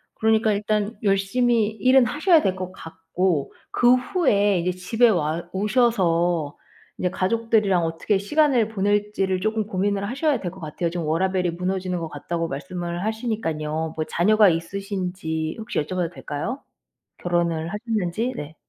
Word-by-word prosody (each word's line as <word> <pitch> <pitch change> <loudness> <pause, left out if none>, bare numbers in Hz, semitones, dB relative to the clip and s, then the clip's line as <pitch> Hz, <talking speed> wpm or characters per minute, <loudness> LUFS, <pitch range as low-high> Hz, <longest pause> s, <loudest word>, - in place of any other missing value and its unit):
그러니까 220 -1 +2
일단 210 +1 -1
열심히 210 +3 +2
일은 250 +4 +4
하셔야 315 - +3
될 190 -7 0
것 185 0 -5
같고 165 -2 -2 0.2
그 245 +1 +5
후에 210 - +2
이제 180 +2 0
집에 225 +7 +2
와 165 -3 0
오셔서 175 - +1 0.4
이제 180 - +1
'가족들이랑 205 -2 +1
어떻게 165 +5 0
시간을 255 0 +2
보낼지'를 205 -2 0
쪼금 215 0 -1
고민을 200 +1 -1
하셔야 280 +2 0
될 180 - -3
것 190 - -13
같아요. 160 +2 -3
지금 170 -2 -3
"워라벨이 180 +2 +1
무너지는 180 +1 -2
것 165 - -4
같다."고 165 +3 -3
말씀을 175 +5 -4
하시니깐요. 160 -9 -2
뭐 155 - -1
자녀가 210 +4 +4
있으신지 180 -2 -3
혹시 220 - -3
여쭤봐도 175 +2 -3
될까요? 170 - -5 0.6
결혼을 170 -2 0
하셨는지? 220 +1 -2
네. 150 +2 -7
190 Hz, 340 characters per minute, -23 LUFS, 170-220 Hz, 0.6 s, 그